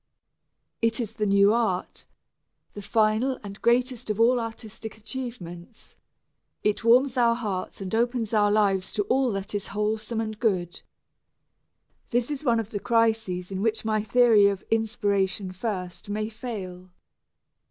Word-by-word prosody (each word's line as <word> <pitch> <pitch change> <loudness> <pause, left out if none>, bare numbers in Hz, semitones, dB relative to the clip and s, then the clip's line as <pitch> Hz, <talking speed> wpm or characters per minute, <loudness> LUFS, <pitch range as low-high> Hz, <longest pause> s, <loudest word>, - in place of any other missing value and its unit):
It 230 +1 +1
is 225 -3 -2
the 210 -1 -1
new 200 +1 +5
art, 220 -6 -1 0.7
the 205 - -7
final 220 +5 +1
and 200 0 -9
greatest 245 0 +1
of 210 0 -1
all 245 +2 +4
artistic 225 -1 -7
achievements; 220 -6 -8 0.7
it 210 +2 0
warms 250 +3 +4
our 235 -1 +4
hearts 205 -5 -4
and 190 0 -5
opens 235 -1 0
our 205 -1 +4
lives 195 -3 +2
to 205 - +1
all 260 +2 +1
that 195 +1 -4
is 205 -1 -3
wholesome 215 +2 -1
and 215 -1 -4
good. 185 -6 -1 1.3
This 245 +3 0
is 290 0 -4
one 235 -5 +3
of 220 -1 -5
the 205 - -3
crises 220 -6 +1
in 190 0 -3
which 225 0 0
my 215 -1 +1
theory 220 -1 +5
of 200 -1 -2
"inspiration 205 -4 0
first" 185 -2 -5
may 215 +1 -2
fail. 195 -6 -7
215 Hz, 145 wpm, -26 LUFS, 200-235 Hz, 1.3 s, new